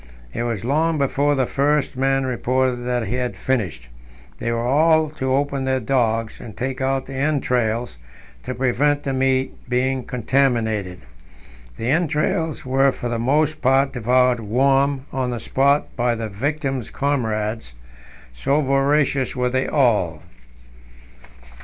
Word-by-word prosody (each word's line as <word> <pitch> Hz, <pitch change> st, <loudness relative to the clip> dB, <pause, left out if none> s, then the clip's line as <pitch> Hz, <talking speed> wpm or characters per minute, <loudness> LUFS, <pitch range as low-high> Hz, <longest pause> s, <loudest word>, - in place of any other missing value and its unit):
It -, -, -3 dB
was 115 Hz, -3 st, -3 dB
long 155 Hz, +5 st, +1 dB
before 145 Hz, +1 st, +1 dB
the 130 Hz, -2 st, +1 dB
first 145 Hz, +2 st, 0 dB
man 135 Hz, +1 st, +1 dB
reported 130 Hz, 0 st, 0 dB
that 125 Hz, -2 st, 0 dB
he 120 Hz, +6 st, -2 dB
had 125 Hz, -1 st, -2 dB
finished; 90 Hz, -, -2 dB, 0.5 s
they 115 Hz, -, -2 dB
were 115 Hz, 0 st, -1 dB
all 155 Hz, +3 st, +3 dB
to 130 Hz, -3 st, -1 dB
open 140 Hz, -1 st, -1 dB
their 130 Hz, 0 st, +1 dB
dogs, 115 Hz, -3 st, 0 dB
and 115 Hz, -4 st, -10 dB
take 130 Hz, +1 st, -3 dB
out 135 Hz, 0 st, 0 dB
the 135 Hz, -, -9 dB
entrails 125 Hz, -, -1 dB, 0.4 s
to 130 Hz, -, -5 dB
prevent 140 Hz, +4 st, +1 dB
the 135 Hz, -, -2 dB
meat 130 Hz, 0 st, +1 dB, 0.2 s
being 130 Hz, +1 st, 0 dB
contaminated. 115 Hz, -7 st, 0 dB, 0.8 s
The 120 Hz, +3 st, -1 dB
entrails 155 Hz, -1 st, 0 dB
were 135 Hz, +1 st, +3 dB
for 120 Hz, -, -5 dB
the 115 Hz, -1 st, -2 dB
most 150 Hz, +5 st, +1 dB
part 135 Hz, +1 st, +3 dB
devoured 125 Hz, 0 st, +2 dB
warm 135 Hz, +5 st, +1 dB
on 130 Hz, -2 st, -1 dB
the 120 Hz, -1 st, -3 dB
spot 140 Hz, +4 st, +1 dB
by 120 Hz, -1 st, +1 dB
the 115 Hz, -1 st, -4 dB
victims' 135 Hz, +3 st, -2 dB
comrades, 110 Hz, -, -2 dB, 0.6 s
so 135 Hz, -, +1 dB
voracious 140 Hz, -1 st, +1 dB
were 125 Hz, -1 st, 0 dB
they 130 Hz, +1 st, 0 dB
all. 105 Hz, -, +1 dB
130 Hz, 140 wpm, -21 LUFS, 120-140 Hz, 0.8 s, all